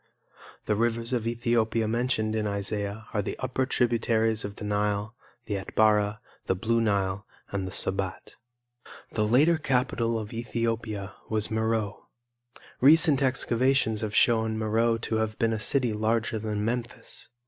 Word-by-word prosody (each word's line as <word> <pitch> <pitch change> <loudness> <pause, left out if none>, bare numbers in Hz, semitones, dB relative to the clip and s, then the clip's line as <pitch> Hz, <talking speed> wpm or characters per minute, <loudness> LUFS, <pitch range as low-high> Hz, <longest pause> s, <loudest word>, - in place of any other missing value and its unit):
The - - +1
rivers 115 +2 0
of 115 -2 -1
Ethiopia 115 -1 +1
mentioned 110 -1 0
in 110 -1 0
Isaiah 100 +1 -3
are 105 - +1
the - - -5
upper 130 0 -1
tributaries 115 -3 +1
of 100 0 -6
the 105 - -7
Nile, 105 +1 -1 0.3
the 105 -2 -2
Atbara, 105 +1 +2 0.3
the 95 - +2
Blue 115 +5 +1
Nile 100 -2 0 0.2
and 95 -2 -2
the - - -6
Sobat. 95 -1 -1 0.8
The 105 -1 0
later 150 +8 +4
capital 125 -5 0
of 110 0 -6
Ethiopia 115 -3 -3 0.2
was 110 -1 -1
Meroe. 110 -2 -1 0.7
Recent 150 +1 +6
excavations 130 -3 +1
have 110 -1 -3
shown 110 -2 +3
Meroe 115 +1 +1
to 115 0 -2
have 110 -1 -1
been 115 0 +1
a 110 - -2
city 125 0 +2
larger 110 +1 0
than 105 -1 -2
Memphis. 120 +1 -4
110 Hz, 145 wpm, -27 LUFS, 105-115 Hz, 0.8 s, Recent